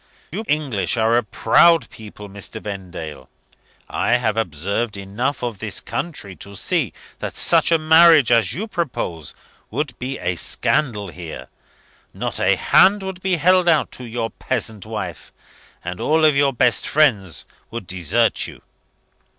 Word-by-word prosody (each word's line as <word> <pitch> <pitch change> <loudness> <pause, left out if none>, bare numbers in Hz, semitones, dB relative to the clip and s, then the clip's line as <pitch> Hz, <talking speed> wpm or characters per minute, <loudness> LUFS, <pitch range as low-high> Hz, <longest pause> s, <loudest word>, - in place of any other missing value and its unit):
You 220 - -4
English 130 - 0
are 115 +1 +3
a 120 - +4
proud 165 +5 +4
people, 105 -1 -11
Mr. 100 +2 -8
Vendale. 90 -9 -7 0.6
I - - 0
have 120 -3 +1
observed 100 +3 -2
enough 110 +9 -3
of 115 -5 -3
this - - -4
country 120 - -5
to 100 0 -9
see - - 0 0.3
that - - -5
such - - +4
a 165 - +5
marriage 160 -4 +6
as 115 -6 +3
you 210 +6 -4
propose 135 - -4 0.3
would 140 +2 -3
be 130 +2 -4
a 90 - -2
scandal 110 - 0
here. 80 -7 -9 0.7
Not - - -3
a - - +3
hand 195 +2 +4
would 190 -1 -6
be 190 -1 +1
held 180 +2 +3
out 160 -3 +3
to 130 - -9
your 115 -1 -4
peasant 110 -2 -4
wife; 105 -6 -6 0.5
and 90 +1 -5
all 155 +1 +4
your 140 -2 +3
best 125 -1 +1
friends 110 - +1 0.2
would 115 -3 -6
desert 90 -3 0
you." - - -13
115 Hz, 150 wpm, -21 LUFS, 100-155 Hz, 0.7 s, marriage